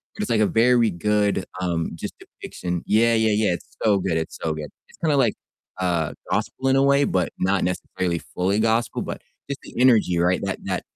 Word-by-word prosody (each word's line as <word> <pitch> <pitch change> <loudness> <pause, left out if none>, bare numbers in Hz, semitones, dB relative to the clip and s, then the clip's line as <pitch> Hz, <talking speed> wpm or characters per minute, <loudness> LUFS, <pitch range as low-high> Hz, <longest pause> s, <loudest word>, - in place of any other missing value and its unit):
but - - -5
it's, 210 - -2
like, 115 - +3
a 105 - +4
very 115 0 +4
good, 105 +1 0 0.2
um, 85 -2 -1
just - - -6
depiction. 90 -1 -6
Yeah, 115 +2 +4
yeah, 110 -1 +3
yeah, 105 -3 +2
it's 85 - -9
so 105 -3 +4
good, 90 -3 -1
it's 80 0 -4
so 80 - -1
good, 75 -2 -6 0.2
it's - - -20
kinda 155 -3 +1
like, 120 -6 +3 0.5
uh, 85 -4 0 0.2
gospel 135 0 -1
in 135 - +4
a 135 - +4
way, 140 +1 +4
but 90 -9 0
not 95 +1 +1
necessarily 90 -1 -2
fully 95 +4 -1
gospel, 115 +1 +1
but - - -6 0.3
just 140 - -4
the - - -12
energy, 115 -8 +4
right, 90 +2 +2
that 100 -1 -3
that 95 -2 -2
100 Hz, 210 wpm, -23 LUFS, 90-115 Hz, 0.5 s, a